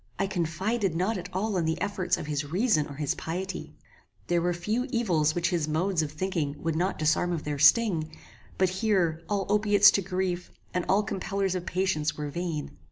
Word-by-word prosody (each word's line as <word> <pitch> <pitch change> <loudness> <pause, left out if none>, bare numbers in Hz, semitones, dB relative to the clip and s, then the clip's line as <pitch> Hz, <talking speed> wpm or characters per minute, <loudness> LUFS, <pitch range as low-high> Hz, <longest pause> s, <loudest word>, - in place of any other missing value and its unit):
I 195 - +1
confided 190 +2 -1
not 190 +4 0
at 180 +1 -7
all 195 +2 -1
in 170 - 0
the 160 0 -1
efforts 200 -3 0
of - - -5
his 150 -1 -2
reason 175 - +1
or 140 - -9
his 145 -1 -1
piety. 180 +2 -5 0.5
There 175 -1 +1
were 175 +1 +1
few 215 +9 -1
evils 175 - +1
which 175 +1 0
his 165 -4 0
modes 165 +3 +1
of 150 -2 -3
thinking 155 -3 -2
would 165 -1 0
not 180 +4 0
disarm 155 +3 +2
of 165 -3 -2
their 145 -1 -3
sting; 160 0 +4 0.5
but 185 -1 +3
here, 185 -5 +1
all 200 -2 0
opiates 205 -1 +6
to 200 - +1
grief, 180 -1 -2 0.2
and 180 -1 -1
all 200 +2 +4
compellers 195 -1 -2
of 180 -1 -4
patience 180 -5 0
were 150 -1 -4
vain. 165 - -4
180 Hz, 195 wpm, -28 LUFS, 160-195 Hz, 0.5 s, opiates